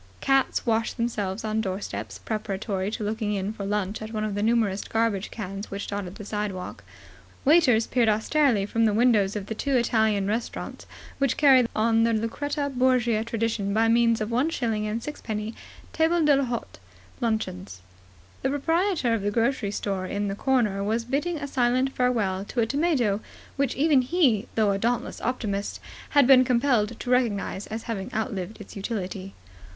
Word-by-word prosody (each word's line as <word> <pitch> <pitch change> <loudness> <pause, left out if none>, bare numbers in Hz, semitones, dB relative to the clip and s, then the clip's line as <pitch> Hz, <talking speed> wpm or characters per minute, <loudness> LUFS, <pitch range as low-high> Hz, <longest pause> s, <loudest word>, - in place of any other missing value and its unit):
Cats 270 0 +1
washed 225 0 0
themselves 215 -4 -2
on 220 0 0
doorsteps, 190 -1 -4
preparatory 200 -2 -3
to 215 - -4
looking 210 0 -1
in 195 +2 -2
for 200 -2 -6
lunch 205 0 -2
at 215 0 -6
one 215 -1 -2
of 215 -1 -2
the 205 - -2
numerous 220 -3 +2
garbage 225 -3 -1
cans 200 -1 -6
which 200 +1 -5
dotted 200 -2 -5
the 210 - -9
sidewalk. 205 -3 -4 0.6
Waiters 265 -7 +5
peered 235 -3 +2
austerely 220 0 +2
from 225 +2 +1
the 210 -2 +2
windows 215 -4 +3
of 205 -2 -3
the 220 - -4
two 270 +4 0
Italian 220 -4 +2
restaurants 220 +4 -4 0.3
which 275 -3 +1
carry 265 -5 +6
on 225 +1 +3
the 230 0 +2
Lucretia 285 +7 -2
Borgia 245 -3 +2
tradition 225 -3 -1
by 225 +1 +3
means 230 0 +3
of 215 +2 -2
one 255 +7 +2
shilling 225 -8 -1
and 225 +2 -3
sixpenny 220 -7 -4 0.4
table 330 +2 +2
d'hôte 275 -5 0 0.4
luncheons. 100 - -3 0.6
The 265 - 0
proprietor 325 - +1
of 225 - 0
the 205 - 0
grocery 230 0 0
store 195 -2 -3
on 205 0 -1
the - - -2
corner 215 -4 +1
was 225 +3 -1
bidding 295 +7 -1
a 285 -1 -5
silent 255 0 +1
farewell 215 -7 +1
to 240 - -4
a - - +3
tomato 270 -7 +1 0.4
which 275 -2 0
even 290 -2 +4
he, 255 - +2
though 215 -2 +3
a 195 - -1
dauntless 240 +3 -1
optimist, 210 -5 -2 0.4
had 285 - +8
been 260 0 +7
compelled 235 -3 +1
to - - -5
recognize 210 -5 0
as 220 +1 -5
having 205 -5 -4
outlived 215 -3 -3
its 210 - -11
utility. 195 -2 -5
225 Hz, 170 wpm, -26 LUFS, 205-250 Hz, 0.6 s, had